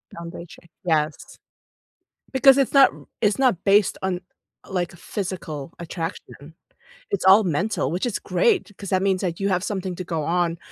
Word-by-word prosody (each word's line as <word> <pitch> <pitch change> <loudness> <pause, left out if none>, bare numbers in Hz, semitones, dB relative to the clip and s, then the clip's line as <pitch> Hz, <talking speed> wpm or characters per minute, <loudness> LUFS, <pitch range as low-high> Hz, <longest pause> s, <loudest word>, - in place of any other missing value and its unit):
Foundation, 170 0 -10 0.2
yes. 155 -3 -1 0.9
Because 270 0 +6
it's 275 - +2
not 275 -1 +7
r - - -15
it's 210 +2 +2
not 250 -10 +2
based 200 0 +3
on, 185 -2 -1 0.5
like, 180 -3 -2
a - - -14
physical 170 -5 -5
attraction. 165 -2 -7 0.6
It's 405 - -1
all 195 +3 +7
mental, 180 +3 -1
which 180 +7 -1
is 235 - -2
great, 445 - +1
'cause 200 - -7
that 185 0 +1
means 190 -2 +1
that 175 -3 -3
you 200 0 0
have 180 -1 0
something 190 -3 -3
to 185 - -5
go 165 -3 -3
on 170 +1 0
185 Hz, 170 wpm, -23 LUFS, 170-205 Hz, 0.9 s, not